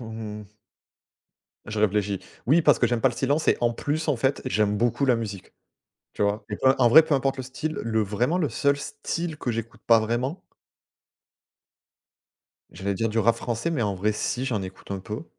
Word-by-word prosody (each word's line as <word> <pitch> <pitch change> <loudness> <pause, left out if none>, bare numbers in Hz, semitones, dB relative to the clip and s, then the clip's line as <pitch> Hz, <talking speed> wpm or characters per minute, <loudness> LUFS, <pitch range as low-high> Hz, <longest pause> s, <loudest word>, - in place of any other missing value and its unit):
mmh 105 -2 -8 1.1
je 105 0 -4
réfléchis. 105 -2 +1 0.3
Oui, 155 +6 +5
parce 145 -6 +5
que - - +3
j'aime 120 -2 0
pas 135 - +4
le 120 - -6
silence 145 +5 0
et - - +5
en 120 0 +2
plus, 155 +6 -3
en 145 - +2
fait, 135 +4 0
j'aime 105 -4 +1
beaucoup 120 +5 +1
la 125 - +4
musique. 105 -4 -6 0.6
Tu - - -5
vois? 105 +1 0
Et 105 - -3
p - - -15 0.2
en 125 -2 +5
vrai, 160 +6 +9
peu 160 - -1
importe 135 0 0
le 130 - -4
style, 150 +5 -4
le 110 -1 +1
vraiment 120 - 0
le 165 - +1
seul 140 0 +1
style 155 +3 -4
que 120 - -2
j'écoute 115 0 -6
pas 115 -1 +6
vraiment 125 - -2 2.3
j'allais 100 +2 -3
dire 115 +4 0
du 110 +1 -2
rap 115 +2 +4
français, 120 +7 -2
mais 130 -8 0
en 100 -2 0
vrai, 105 +3 +1
si 125 +4 -2
j'en 115 -7 -1
écoute 95 +1 -10
un 95 - -4
peu. 110 - -6
115 Hz, 200 wpm, -25 LUFS, 105-135 Hz, 2.3 s, vrai